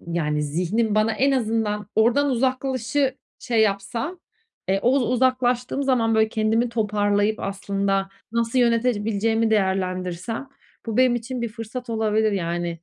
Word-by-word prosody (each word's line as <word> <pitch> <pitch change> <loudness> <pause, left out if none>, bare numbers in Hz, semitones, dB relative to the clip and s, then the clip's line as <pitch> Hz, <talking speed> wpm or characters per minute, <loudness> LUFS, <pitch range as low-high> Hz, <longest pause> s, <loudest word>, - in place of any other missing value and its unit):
yani 150 -3 -1
zihnim 180 +9 0
bana 215 +1 +2
en 270 +6 +2
azından 220 -4 -1
oradan 245 +6 +3
"uzaklaş"ı 260 +1 0 0.2
şey 230 -2 0
yapsa, 220 - -1 0.5
eee, 195 +1 +2
oz 260 +3 +3
uzaklaştığım 250 +1 +1
zaman 240 -4 +2
böyle 220 0 +3
kendimi 220 +2 +1
toparlayıp 210 -1 0
aslında 195 0 -1 0.2
nasıl 235 +2 0
yönetebileceğimi 225 -2 +1
değerlendirsem 190 +3 -1 0.4
bu 225 - -3
benim 255 -1 +4
için 240 +1 -4
bir 235 - -1
fırsat 230 +2 -7
olabilir 220 -1 +1
yani. 175 -2 -2
225 Hz, 125 wpm, -23 LUFS, 200-245 Hz, 0.5 s, benim